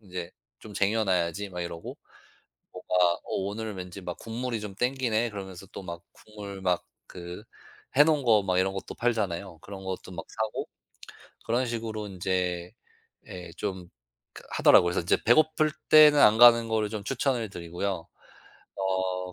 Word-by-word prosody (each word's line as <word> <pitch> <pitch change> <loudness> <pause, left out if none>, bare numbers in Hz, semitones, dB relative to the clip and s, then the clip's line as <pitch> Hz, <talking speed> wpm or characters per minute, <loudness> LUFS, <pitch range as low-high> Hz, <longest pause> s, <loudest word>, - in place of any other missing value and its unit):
인제 90 -4 -7 0.3
"좀 110 - -11
쟁여놔야지." 100 -3 0
막 90 -1 -6
이러고. 85 -1 -6 0.8
뭐가 90 -1 +2
"어 - - -4
오늘 105 +3 -3
왠지 90 +1 -8
막 90 -1 -6
국물이 115 0 -4
좀 105 -2 -7
땡기네." 120 -1 0
그러면서 95 -2 -8
또 - - -7
막 85 -1 -7
국물 100 -2 -10
막 90 -2 +1 0.2
그 90 +3 -9 0.5
해 145 - +9
놓은 155 -2 +2
거 110 -4 +4
막 90 -1 +1
이런 95 +1 +1
것도 95 - -6
팔잖아요. 100 -7 -2
그런 95 -1 -9
것도 95 0 -6
막 85 -2 -7
사고 110 -1 -3 0.8
그런 120 +3 +1
식으로 110 -3 -4
인제 90 -2 -2 0.6
예 90 -1 -8
좀 95 -4 -4 0.4
그 - - -12
하더라고요. - - +6
그래서 85 - 0
인제 85 - +2
배고플 155 +5 +4 0.2
때는 150 -1 +8
안 110 -4 +6
가는 115 -1 +8
거를 110 -1 0
좀 105 -1 -6
추천을 125 -2 -1
드리고요. 85 0 -4 0.7
어 95 -1 -2
100 Hz, 300 characters per minute, -27 LUFS, 90-115 Hz, 0.8 s, 해